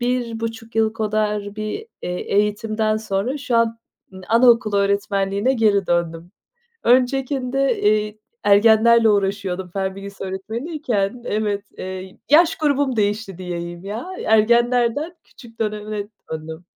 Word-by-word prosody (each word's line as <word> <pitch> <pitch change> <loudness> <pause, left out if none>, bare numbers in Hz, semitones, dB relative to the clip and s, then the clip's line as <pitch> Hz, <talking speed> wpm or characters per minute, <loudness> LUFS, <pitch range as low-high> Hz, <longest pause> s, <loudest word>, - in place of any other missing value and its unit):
1.5 230 -2 -3
yıl 220 -1 +2
kadar 210 -2 -1
bir, 215 - -4 0.2
eee, - - -3 0.3
eğitimden 215 +1 +1
sonra 220 +6 -2
şu 250 -4 -1
an 230 0 +2 0.3
ı 190 - -10
anaokulu 230 -2 +4
öğretmenliğine 200 +3 +1
geri 210 -5 +2
döndüm. 170 0 -1 0.5
Öncekinde, 260 +1 +1
eee, 210 0 +1 0.3
ergenlerle 225 +2 +5
uğraşıyordum. 195 -2 0
Fen 190 0 -2
bilgisi 195 0 -8
öğretmeniyken, 225 - -3
evet, 205 -3 -1
eee, 185 0 -7
yaş 330 +3 +5
grubum 285 -4 +1
değişti 205 -3 -1
diyeyim, 175 0 -6
ya. 215 - -5 0.2
Ergenlerden, 240 +8 +2
küçük 230 -2 -17
döneme 210 -1 -3 0.2
döndüm. 160 +2 -7
215 Hz, 115 wpm, -21 LUFS, 200-235 Hz, 0.5 s, ergenlerle